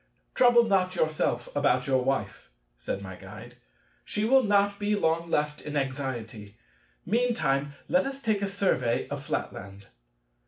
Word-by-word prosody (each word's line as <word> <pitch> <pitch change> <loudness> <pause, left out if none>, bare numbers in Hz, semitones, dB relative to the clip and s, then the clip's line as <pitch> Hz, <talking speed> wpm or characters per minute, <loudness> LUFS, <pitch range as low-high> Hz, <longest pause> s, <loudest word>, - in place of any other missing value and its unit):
"Trouble 240 -1 +6
not 190 -4 +1
yourself 155 -6 0
about 140 -2 +2
your 130 -2 +2
Wife," 105 -8 -2 0.3
said 100 +10 -5
my 95 -1 -8
Guide: 105 +6 -12 0.5
"she 210 +1 -2
will 265 +3 +5
not 200 -2 +2
be 210 0 +1
long 165 -2 0
left 150 -1 -1
in 150 0 -4
anxiety; 120 -6 -4 0.5
meantime, 150 - 0
let 270 +1 +2
us 275 0 -5
take 220 -6 0
a 200 - 0
survey 185 -12 0
of - - -5
Flatland." 100 +1 -5
150 Hz, 145 wpm, -27 LUFS, 120-205 Hz, 0.5 s, Trouble